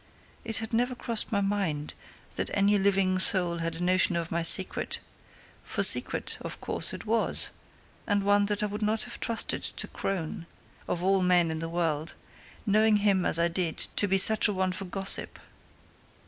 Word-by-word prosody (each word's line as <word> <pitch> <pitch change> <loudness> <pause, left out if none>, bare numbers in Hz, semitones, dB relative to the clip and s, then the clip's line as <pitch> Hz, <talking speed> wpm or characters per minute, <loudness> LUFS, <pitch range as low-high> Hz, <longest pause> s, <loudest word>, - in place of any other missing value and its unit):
It 225 -1 -5
had 225 +1 -6
never 245 +2 0
crossed 235 -3 -2
my 200 -2 0
mind 195 -7 -2 0.4
that - - -2
any 200 +1 +2
living 190 -1 +2
soul 180 -2 +3
had 165 0 -3
a 170 - -5
notion 180 0 +3
of 170 -1 -3
my 170 - -1
secret 185 +3 +2 0.7
for - - -2
secret, - - +2
of - - -7
course, - - -3
it - - -8
was, 225 +1 0 0.6
and 205 -2 0
one 205 0 +2
that 210 0 -1
I - - +2
would 210 +1 -5
not 215 +1 0
have 245 - -8
trusted 230 -1 -1
to - - -2
Crone, 170 -3 -5 0.4
of 175 - -3
all 195 0 +2
men 180 -2 +2
in 160 - -4
the 165 0 -5
world, 165 -2 -2 0.5
knowing 215 0 +3
him 200 -3 +1
as - - +5
I 170 0 +2
did 170 -1 -1 0.2
to 205 - +2
be 195 0 +2
such 215 +3 +6
a 210 - -1
one 185 -1 -1
for 185 +2 -6
gossip. 195 +1 0
195 Hz, 185 wpm, -27 LUFS, 175-210 Hz, 0.7 s, such